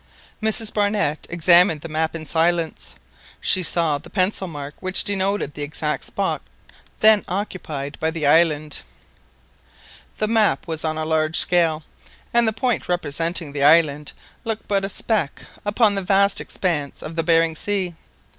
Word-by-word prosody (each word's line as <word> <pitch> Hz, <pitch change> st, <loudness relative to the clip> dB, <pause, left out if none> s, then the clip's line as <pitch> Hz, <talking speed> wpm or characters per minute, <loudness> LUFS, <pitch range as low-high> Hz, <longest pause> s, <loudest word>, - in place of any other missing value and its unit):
Mrs 220 Hz, 0 st, +1 dB
Barnett 205 Hz, -7 st, 0 dB
examined 170 Hz, -1 st, +5 dB
the 165 Hz, -, -7 dB
map 160 Hz, +1 st, -2 dB
in 160 Hz, -1 st, -6 dB
silence. 165 Hz, +1 st, -1 dB, 0.4 s
She 185 Hz, -, +2 dB
saw 165 Hz, -4 st, 0 dB
the -, -, -14 dB
pencil 190 Hz, 0 st, +2 dB
mark 145 Hz, -3 st, -7 dB
which 185 Hz, 0 st, +1 dB
denoted 200 Hz, -5 st, -1 dB
the 150 Hz, -, -8 dB
exact 150 Hz, +1 st, -3 dB
spot -, -, -2 dB, 0.6 s
then 215 Hz, -1 st, +6 dB
occupied 160 Hz, -7 st, -5 dB
by 160 Hz, -, 0 dB
the 160 Hz, -2 st, -3 dB
island. 155 Hz, -1 st, +3 dB, 1.4 s
The 215 Hz, -, 0 dB
map 210 Hz, -11 st, +2 dB
was 160 Hz, -1 st, -2 dB
made 160 Hz, -, 0 dB
on 155 Hz, -, -4 dB
a 155 Hz, -, -2 dB
large 155 Hz, 0 st, 0 dB
scale, 165 Hz, -3 st, +2 dB, 0.5 s
and 235 Hz, -1 st, +5 dB
the -, -, +3 dB
point 245 Hz, -1 st, -2 dB
representing 165 Hz, -1 st, -2 dB
the 140 Hz, -1 st, -2 dB
island 150 Hz, -1 st, +3 dB, 0.3 s
looked 225 Hz, -1 st, -4 dB
but 200 Hz, -1 st, 0 dB
a 195 Hz, -, -2 dB
speck 165 Hz, -, -2 dB, 0.2 s
upon 205 Hz, +1 st, +2 dB
the 195 Hz, -, -1 dB
vast 195 Hz, +1 st, +2 dB
expanse 150 Hz, -7 st, -3 dB
of 160 Hz, -, -7 dB
the 165 Hz, -, +1 dB
Behring 165 Hz, 0 st, +2 dB
Sea. 190 Hz, 0 st, -2 dB
170 Hz, 155 wpm, -21 LUFS, 155-200 Hz, 1.4 s, then